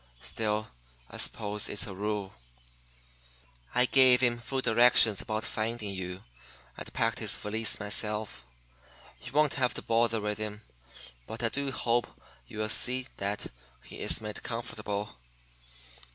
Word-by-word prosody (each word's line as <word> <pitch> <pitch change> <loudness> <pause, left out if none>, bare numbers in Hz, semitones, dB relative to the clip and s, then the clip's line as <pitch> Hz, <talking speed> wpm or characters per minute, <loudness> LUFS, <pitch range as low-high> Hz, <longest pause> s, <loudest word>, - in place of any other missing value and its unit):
Still, 110 -1 -2 0.4
I - - -6
suppose 105 0 0
it's 105 - -1
a 100 - -7
rule. 100 0 -3 1.4
"'I 125 - +5
gave 130 -1 +7
him 120 -2 +2
full 130 +3 -3
directions 115 -3 +6
about 110 0 -3
finding 110 -1 -3
you, 95 0 -6 0.5
and - - -9
packed - - 0
his - - +1
valise 110 +1 -1
myself. 105 - -1 0.8
You 125 - -9
won't 150 +1 +3
have 125 - +1
to - - -6
bother 115 0 +2
with 105 0 -3
him; 105 0 -5 0.7
but 115 +2 -7
I 115 - +2
do 140 +3 -2
hope 120 -2 0 0.4
you'll 110 0 -4
see 130 +3 +1
that 100 +1 -3 0.4
he - - -10
is - - +3
made 105 -1 -6
comfortable. 105 - -5
110 Hz, 135 wpm, -29 LUFS, 105-120 Hz, 1.4 s, gave